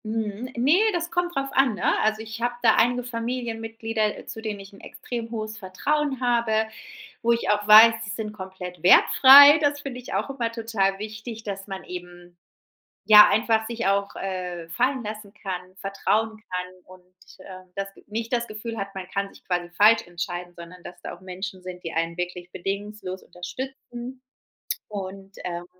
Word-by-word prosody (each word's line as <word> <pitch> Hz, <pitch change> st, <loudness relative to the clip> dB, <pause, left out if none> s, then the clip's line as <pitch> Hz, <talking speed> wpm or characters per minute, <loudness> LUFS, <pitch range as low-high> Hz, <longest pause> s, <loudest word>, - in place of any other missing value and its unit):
Mhm. 220 Hz, +2 st, -3 dB
Ne, 275 Hz, +9 st, +4 dB
das 345 Hz, -1 st, -2 dB
kommt 350 Hz, 0 st, -1 dB
drauf 275 Hz, 0 st, -1 dB
an, 265 Hz, -5 st, +3 dB
ne? -, -, +1 dB
Also, 215 Hz, 0 st, +1 dB
ich 220 Hz, +1 st, -8 dB
habe 240 Hz, 0 st, 0 dB
da -, -, +6 dB
einige 245 Hz, +2 st, +2 dB
Familienmitglieder, 225 Hz, -2 st, -3 dB
äh, -, -, -11 dB
zu 220 Hz, -, -8 dB
denen 215 Hz, -2 st, -4 dB
ich 195 Hz, 0 st, -12 dB
’n 200 Hz, -, -14 dB
extrem 235 Hz, -2 st, -7 dB
hohes 220 Hz, -1 st, -5 dB
Vertrauen 270 Hz, +9 st, -1 dB
habe, 235 Hz, -3 st, +1 dB, 0.6 s
wo 235 Hz, 0 st, +3 dB
ich 235 Hz, -, -1 dB
auch 210 Hz, 0 st, +1 dB
weiß, 220 Hz, +2 st, +9 dB
die 215 Hz, -, -6 dB
sind 215 Hz, 0 st, -5 dB
komplett 190 Hz, -3 st, -9 dB
wertfrei. 280 Hz, -, +9 dB
Das 290 Hz, 0 st, +1 dB
finde 270 Hz, -3 st, -6 dB
ich 250 Hz, -, -10 dB
auch -, -, -1 dB
immer 240 Hz, -4 st, -3 dB
total 220 Hz, -4 st, 0 dB
wichtig, 220 Hz, +2 st, -7 dB
dass 195 Hz, -2 st, -5 dB
man 195 Hz, -2 st, -6 dB
eben, 175 Hz, -1 st, -10 dB, 0.7 s
ja, 210 Hz, -1 st, +9 dB
einfach 220 Hz, 0 st, +2 dB
sich 230 Hz, -1 st, -3 dB
auch, 200 Hz, 0 st, +1 dB
äh, 180 Hz, -3 st, -5 dB
fallen 260 Hz, +8 st, 0 dB
lassen 210 Hz, -1 st, -7 dB
kann, 185 Hz, -2 st, -7 dB
vertrauen 210 Hz, +3 st, -1 dB
kann 180 Hz, 0 st, -4 dB
und, 185 Hz, 0 st, -16 dB, 0.4 s
äh, 185 Hz, -1 st, -11 dB
das 195 Hz, 0 st, -4 dB
Ge -, -, -20 dB
nicht 225 Hz, +3 st, -5 dB
das 235 Hz, -1 st, 0 dB
Gefühl 220 Hz, +2 st, -6 dB
hat, 195 Hz, 0 st, -5 dB
man 190 Hz, -1 st, -7 dB
kann 200 Hz, +1 st, -2 dB
sich -, -, -19 dB
quasi 175 Hz, -1 st, -2 dB
falsch 210 Hz, +5 st, +4 dB
entscheiden, 175 Hz, 0 st, -5 dB
sondern 175 Hz, +1 st, -11 dB
dass 175 Hz, -, -10 dB
da -, -, -6 dB
auch 175 Hz, -, -18 dB
Menschen 185 Hz, +1 st, -7 dB
sind, 180 Hz, -1 st, -9 dB
die 165 Hz, -, -4 dB
einen 165 Hz, +1 st, -1 dB
wirklich 180 Hz, 0 st, -5 dB
bedingungslos 195 Hz, 0 st, -5 dB
unterstützen 255 Hz, +5 st, -8 dB, 0.7 s
und, 195 Hz, -1 st, -7 dB
ähm, 175 Hz, -1 st, -4 dB
210 Hz, 180 wpm, -25 LUFS, 185-230 Hz, 0.7 s, weiß